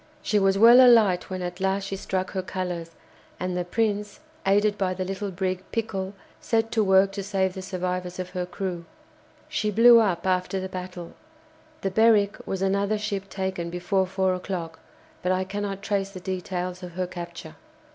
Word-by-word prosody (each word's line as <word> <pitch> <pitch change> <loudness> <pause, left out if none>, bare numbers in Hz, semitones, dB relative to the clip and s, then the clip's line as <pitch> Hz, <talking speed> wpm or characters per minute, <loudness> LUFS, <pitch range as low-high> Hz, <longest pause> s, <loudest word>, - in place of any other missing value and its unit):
She 210 - +2
was 195 0 +3
well 235 +4 +9
alight 220 -7 +5
when 185 -1 -4
at 175 +1 -5
last 195 +1 0
she 195 0 -4
struck 190 -1 -3
her 190 - -2
colours, 180 -3 -4 0.5
and 180 0 -2
the 180 - 0
"Prince," 205 +3 -1 0.3
aided 205 +1 +3
by 185 -2 -1
the 185 0 -3
little 195 +2 -3
brig 185 0 -2
"Pickle," 200 -4 -3 0.2
set 225 0 0
to 220 - +2
work 190 0 +4
to 200 - -4
save 190 -1 0
the 190 - -6
survivors 180 -1 -3
of 185 0 -5
her 180 -1 -3
crew. 180 -3 -4 0.6
She 215 - -1
blew 230 +3 +7
up 190 -6 +1
after 185 +1 0
the 190 - -4
battle. 180 -2 -7 0.7
The 195 - -1
"Berwick" 215 -1 +4
was 190 0 -2
another 200 +2 +1
ship 200 -2 -4
taken 190 -3 -3
before 180 +2 0
four 190 0 +1
o'clock, 180 -3 -5 0.4
but 180 - 0
I 185 0 +1
cannot 200 0 -4
trace 200 -2 -1
the 195 -2 -9
details 180 0 -4
of 180 -2 -8
her 185 +1 -2
capture. 170 -2 -8
190 Hz, 180 wpm, -25 LUFS, 180-200 Hz, 0.7 s, well